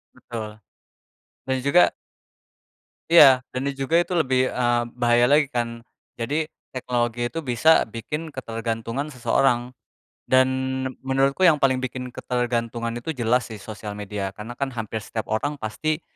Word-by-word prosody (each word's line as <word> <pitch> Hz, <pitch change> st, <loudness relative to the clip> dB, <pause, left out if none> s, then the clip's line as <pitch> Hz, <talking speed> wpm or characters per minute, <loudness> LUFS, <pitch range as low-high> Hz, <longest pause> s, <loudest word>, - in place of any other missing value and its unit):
Betul, 110 Hz, -2 st, -8 dB, 0.9 s
dan 130 Hz, 0 st, 0 dB
juga 140 Hz, +7 st, +4 dB, 1.2 s
iya, 135 Hz, -6 st, +7 dB
dan 130 Hz, +2 st, -1 dB
ini 140 Hz, -, -6 dB
juga, 160 Hz, +6 st, +2 dB
itu 175 Hz, 0 st, -2 dB
lebih, 130 Hz, -4 st, +2 dB
eee, 120 Hz, -1 st, +1 dB, 0.2 s
bahaya 120 Hz, +1 st, +4 dB
lagi, 145 Hz, 0 st, +5 dB
kan. 115 Hz, -1 st, -3 dB, 0.3 s
Jadi 150 Hz, +7 st, -1 dB, 0.2 s
teknologi 120 Hz, -1 st, -1 dB
itu 165 Hz, -, -4 dB
bisa 125 Hz, +7 st, +4 dB
bikin 150 Hz, +8 st, -6 dB
ketergantungan 115 Hz, +3 st, -4 dB
seseorang. 125 Hz, 0 st, +1 dB, 0.6 s
Dan, 130 Hz, 0 st, +4 dB, 0.6 s
menurutku 135 Hz, +6 st, +2 dB
yang 155 Hz, -4 st, +5 dB
paling 130 Hz, -1 st, +3 dB
bikin 130 Hz, 0 st, -4 dB
ketergantungan 120 Hz, -1 st, -2 dB
itu, 160 Hz, +7 st, -4 dB
jelas 125 Hz, -1 st, +1 dB
sih, 105 Hz, -, -9 dB
sosial 105 Hz, 0 st, -7 dB
media, 100 Hz, -1 st, -5 dB
karena 110 Hz, +5 st, -9 dB
kan, 135 Hz, -2 st, -2 dB
hampir 110 Hz, -1 st, -5 dB
setiap 110 Hz, -2 st, -5 dB
orang, 110 Hz, +7 st, 0 dB
pasti 155 Hz, +9 st, -2 dB
125 Hz, 135 wpm, -24 LUFS, 115-135 Hz, 1.2 s, iya